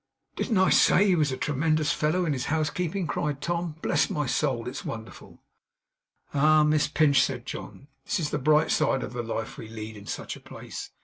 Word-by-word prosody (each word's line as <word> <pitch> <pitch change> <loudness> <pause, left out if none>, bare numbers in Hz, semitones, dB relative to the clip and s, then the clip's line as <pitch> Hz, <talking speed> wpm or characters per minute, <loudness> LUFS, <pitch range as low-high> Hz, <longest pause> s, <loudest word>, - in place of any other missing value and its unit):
'Didn't 220 - 0
I 190 0 +4
say 200 - +5
he 190 -3 +4
was 150 -4 +1
a 130 - -3
tremendous 150 +2 +1
fellow 165 +4 +1
in 155 - +1
his 130 -3 -3
housekeeping?' 160 +4 -1
cried 150 -2 -2
Tom. 170 0 -2
'Bless - - +2
my 150 -1 -1
soul! 125 -2 0
It's 130 +2 -5
wonderful.' 110 0 -9 0.9
'Ah, 155 +2 +5
Miss 150 0 +3
Pinch,' 145 -5 +4
said 125 -2 -2
John. 135 - -8 0.2
'This - - -1
is 150 - -1
the 150 - -1
bright 150 +2 +3
side 145 -3 +2
of - - -6
the 120 - -2
life 115 -1 -5
we 110 - -8
lead 110 0 -7
in 105 0 -12
such - - -5
a - - -12
place. - - -9
150 Hz, 200 wpm, -27 LUFS, 130-155 Hz, 0.9 s, say